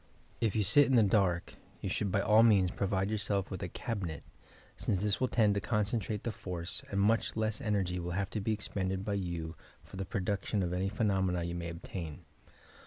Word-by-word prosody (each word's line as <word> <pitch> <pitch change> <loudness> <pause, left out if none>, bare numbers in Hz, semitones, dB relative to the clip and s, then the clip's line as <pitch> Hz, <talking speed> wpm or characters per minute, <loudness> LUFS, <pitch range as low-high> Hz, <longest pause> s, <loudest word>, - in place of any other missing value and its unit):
If 115 -4 +1
you 105 - +3
sit 145 +8 +6
in 135 - +3
the 115 - +7
dark 95 -4 +2 0.3
you - - -4
should 100 -2 -1
by 100 - +2
all 110 +2 +6
means 100 -6 +5
provide 95 0 0
yourself 100 -2 -1
with 95 - -4
a - - -2
cabinet, 90 -8 -4 0.5
since 95 0 -1
this 105 +2 0
will 130 - +3
tend 110 -4 +3
to 100 - -1
concentrate 105 -1 -1
the 120 - -1
force, 90 -5 -5
and 100 - -1
much 110 +3 +2
less 110 -1 -1
energy 95 -5 0
will 85 0 -3
have 100 -1 -1
to 110 - -2
be 110 - 0
expended 95 -2 -2
by 105 - -1
you 85 -4 -3 0.3
for - - -11
the 95 - -3
production 100 +1 -1
of 90 0 -1
any 95 +2 0
phenomena 95 -4 +1
you 85 0 -3
may 85 -1 -4
obtain. 85 -2 -7
100 Hz, 205 wpm, -32 LUFS, 90-105 Hz, 0.5 s, the